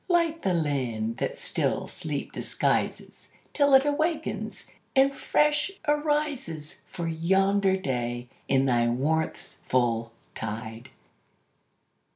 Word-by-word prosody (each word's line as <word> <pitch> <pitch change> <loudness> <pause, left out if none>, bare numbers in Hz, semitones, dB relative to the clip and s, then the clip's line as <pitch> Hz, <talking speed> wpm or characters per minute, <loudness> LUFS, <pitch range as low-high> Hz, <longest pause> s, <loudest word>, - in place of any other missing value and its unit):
Light 335 -2 +2
the 185 -2 +1
land 125 -8 -1
that - - -2
still - - -1
sleep - - -5
disguises - - -1 0.2
Till 285 -2 +5
it 265 +1 +6
awakens 310 +3 -1 0.3
and 270 +1 +4
fresh 300 +3 +2 0.2
arises 295 - -1
For 170 -1 -4
yonder 190 +4 +2
day 120 -6 -3 0.2
in 135 0 +3
thy 120 -3 +3
warmth's 150 +7 -1
full 115 -2 +1 0.2
tide! 110 +2 -6
165 Hz, 105 wpm, -27 LUFS, -, 0.3 s, it